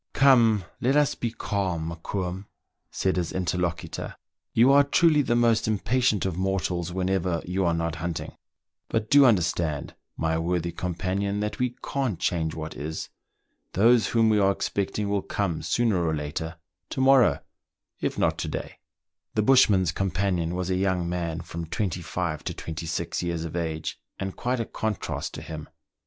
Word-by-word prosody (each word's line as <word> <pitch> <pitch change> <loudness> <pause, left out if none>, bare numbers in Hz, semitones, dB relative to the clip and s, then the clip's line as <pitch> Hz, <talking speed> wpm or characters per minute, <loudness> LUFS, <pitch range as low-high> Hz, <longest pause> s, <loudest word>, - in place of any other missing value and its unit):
Come, 115 -8 +5
let's 140 +3 +3
be 120 - -2
calm, 95 -7 -2
Mokoum," 90 +3 -4 0.4
said 95 -1 0
his 85 -2 -1
interlocutor. 90 -2 -2 0.4
"You 120 +4 +5
are 140 +1 +7
truly 155 +1 +4
the 120 -4 +1
most 115 -2 +3
impatient 110 0 +1
of 95 -3 -1
mortals 90 -2 -1
whenever 90 -2 0
you 95 +2 0
are 85 - +2
not 85 -1 -2
hunting; 85 0 -4 0.5
but 110 -1 -1
do 140 -1 +8
understand, 85 - +1 0.2
my 80 0 0
worthy 85 0 -1
com 90 +1 -4
panion, 100 +3 -1
that 105 0 -3
we 125 -1 0
can't 130 -11 -1
change 80 -3 0
what 80 -2 -6
is. 75 +4 -5 0.6
Those 115 +4 +5
whom 115 -1 +3
we 105 - +3
are 100 -1 +4
expecting 100 +1 -2
will 100 -1 0
come 95 -6 -2
sooner 110 -7 +1
or 80 -1 +1
later 80 +2 -4 0.2
— - - -57
to - - -4
morrow, 130 -2 +5 0.6
it - - -2
not - - +1
to - - -2
day." - - -5 0.6
The 110 - +2
bushman's 105 -8 +5
companion 90 -3 -1
was 90 0 -2
a 90 - +1
young 95 -2 0
man, 85 -2 -2
from 85 -1 -6
twenty 95 -2 -2
five 85 -2 -3
to - - -3
twenty 80 0 -6
six 80 +1 -2
years 85 -2 -2
of 80 - -6
age, 80 -2 -3 0.2
and 95 -1 -4
quite 125 0 -1
a 115 - -1
contrast 110 -3 -3
to - - -7
him. 80 -1 -7
95 Hz, 170 wpm, -26 LUFS, 85-110 Hz, 0.6 s, do